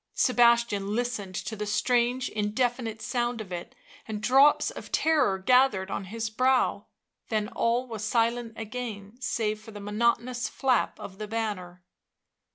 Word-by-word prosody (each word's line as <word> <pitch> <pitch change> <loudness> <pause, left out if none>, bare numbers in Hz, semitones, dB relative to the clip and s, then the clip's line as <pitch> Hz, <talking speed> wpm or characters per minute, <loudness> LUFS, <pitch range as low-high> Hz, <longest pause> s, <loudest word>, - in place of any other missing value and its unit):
Sebastian 235 -5 +3
listened 225 -6 -2
to 220 - -4
the 210 0 -4
strange 245 +3 +1
indefinite 225 +1 -1
sound 240 -1 -1
of 205 -4 -7
it 175 -1 -6 0.3
and 215 -1 -4
drops 270 +7 +4
of - - -10
terror 295 -12 +3
gathered 210 -2 +3
on 195 - -3
his 225 +3 -4
brow; 255 +4 +1 0.4
then 215 -2 0
all 235 +1 0
was 225 -4 -6
silent 230 +1 0
again 220 -2 -6
save 215 -4 -1
for 215 - -13
the 210 -1 -9
monotonous 235 +4 0
flap 260 -3 0
of 195 +1 -9
the 215 - -4
banner. 200 -5 -4
225 Hz, 145 wpm, -27 LUFS, 210-245 Hz, 0.4 s, drops